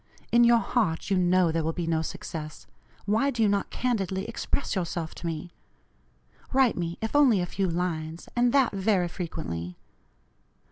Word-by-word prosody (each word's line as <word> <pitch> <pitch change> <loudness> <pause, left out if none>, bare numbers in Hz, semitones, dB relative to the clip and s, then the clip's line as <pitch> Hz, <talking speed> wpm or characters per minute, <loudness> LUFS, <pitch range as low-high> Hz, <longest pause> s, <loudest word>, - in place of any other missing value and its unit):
In 240 0 +6
your 235 0 +6
heart 210 -7 0
you 195 - +3
know 180 -1 +3
there 165 0 0
will 160 +1 -1
be 175 0 -3
no 165 -1 +1
success. 155 -1 -6 0.4
Why 220 +7 +2
do 240 -4 0
you - - +4
not 200 0 0
candidly 195 -6 -1
express 235 +4 -2
yourself 170 -3 -3
to 170 - -6
me? 165 +2 -4 1.0
Write 265 -3 +4
me, 170 -1 -3
if 225 - -3
only 265 -9 +5
a 175 - 0
few 190 +1 -1
lines, 165 -2 -3
and 240 0 +3
that 270 -2 +4
very 195 -2 +1
frequently. 150 - -5
185 Hz, 170 wpm, -27 LUFS, 165-230 Hz, 1.0 s, In